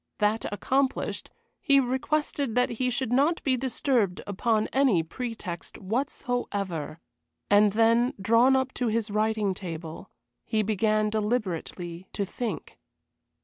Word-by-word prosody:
That 210 Hz, +1 st, 0 dB
accomplished, 265 Hz, +6 st, -1 dB, 0.3 s
he 280 Hz, -2 st, +4 dB
requested 270 Hz, 0 st, -1 dB
that 250 Hz, 0 st, +3 dB
he 250 Hz, +2 st, 0 dB
should 250 Hz, -1 st, -1 dB
not 295 Hz, +6 st, +2 dB
be 265 Hz, -2 st, +2 dB
disturbed 250 Hz, -6 st, 0 dB
upon 215 Hz, +2 st, +1 dB
any 260 Hz, -11 st, +3 dB
pretext 200 Hz, -2 st, -6 dB
whatsoever. 200 Hz, -, -3 dB, 0.5 s
And 205 Hz, 0 st, +5 dB
then, 230 Hz, +3 st, +3 dB
drawn 230 Hz, +6 st, +4 dB
up 260 Hz, 0 st, 0 dB
to 245 Hz, -, +2 dB
his 220 Hz, -1 st, 0 dB
writing 215 Hz, -1 st, +1 dB
table, 165 Hz, -3 st, -7 dB, 0.3 s
he 215 Hz, -1 st, 0 dB
began 215 Hz, 0 st, +1 dB
deliberately 190 Hz, -5 st, -2 dB
to 200 Hz, -, -1 dB
think. 235 Hz, +4 st, -5 dB
220 Hz, 120 wpm, -27 LUFS, 200-250 Hz, 0.5 s, And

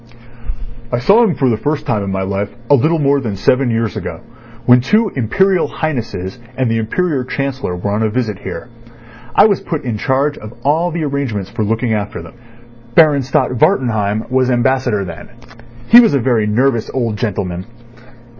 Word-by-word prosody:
"I 120 Hz, -, +1 dB
saw 200 Hz, -, +4 dB
him 205 Hz, -8 st, +1 dB
for 135 Hz, -, +1 dB
the 115 Hz, -3 st, +1 dB
first 150 Hz, 0 st, -1 dB
time 105 Hz, -3 st, 0 dB
in 100 Hz, -, -4 dB
my 95 Hz, 0 st, -2 dB
life 100 Hz, +1 st, -2 dB, 0.2 s
a -, -, +8 dB
little 155 Hz, +5 st, +3 dB
more 140 Hz, -2 st, +2 dB
than 110 Hz, -7 st, -4 dB
seven 125 Hz, +6 st, +2 dB
years 115 Hz, -3 st, -1 dB
ago, -, -, -6 dB, 0.4 s
when 125 Hz, 0 st, +6 dB
two 210 Hz, -, +2 dB
Imperial 180 Hz, -, +1 dB
Highnesses 115 Hz, -, -4 dB, 0.2 s
and 130 Hz, -3 st, 0 dB
the 115 Hz, -, +1 dB
Imperial 140 Hz, +5 st, -1 dB
Chancellor 130 Hz, -6 st, -3 dB
were 95 Hz, +3 st, -3 dB
on 105 Hz, +2 st, -1 dB
a 110 Hz, -, +1 dB
visit 110 Hz, -4 st, -2 dB
here. 120 Hz, -, -7 dB, 0.7 s
I 205 Hz, -, +7 dB
was 205 Hz, -3 st, +2 dB
put 160 Hz, -4 st, -4 dB
in 115 Hz, -5 st, -3 dB
charge 140 Hz, +5 st, 0 dB
of 110 Hz, +1 st, -10 dB
all 160 Hz, +5 st, +2 dB
the 165 Hz, -1 st, -3 dB
arrangements 130 Hz, -10 st, -3 dB
for 110 Hz, -, -2 dB
looking 115 Hz, +2 st, 0 dB
after 105 Hz, -1 st, -3 dB
them. -, -, -11 dB, 0.6 s
Baron 150 Hz, -4 st, +5 dB
Stott 130 Hz, 0 st, 0 dB
Wartenheim 110 Hz, -4 st, +1 dB
was 130 Hz, 0 st, +2 dB
Ambassador 120 Hz, -4 st, +1 dB
then. 90 Hz, -, -9 dB, 0.6 s
He 235 Hz, -, +10 dB
was 225 Hz, -11 st, +4 dB
a -, -, +2 dB
very 115 Hz, -3 st, +1 dB
nervous 120 Hz, +1 st, +1 dB
old 115 Hz, -5 st, -1 dB
gentleman. 95 Hz, -5 st, -3 dB
125 Hz, 185 wpm, -16 LUFS, 105-140 Hz, 0.7 s, He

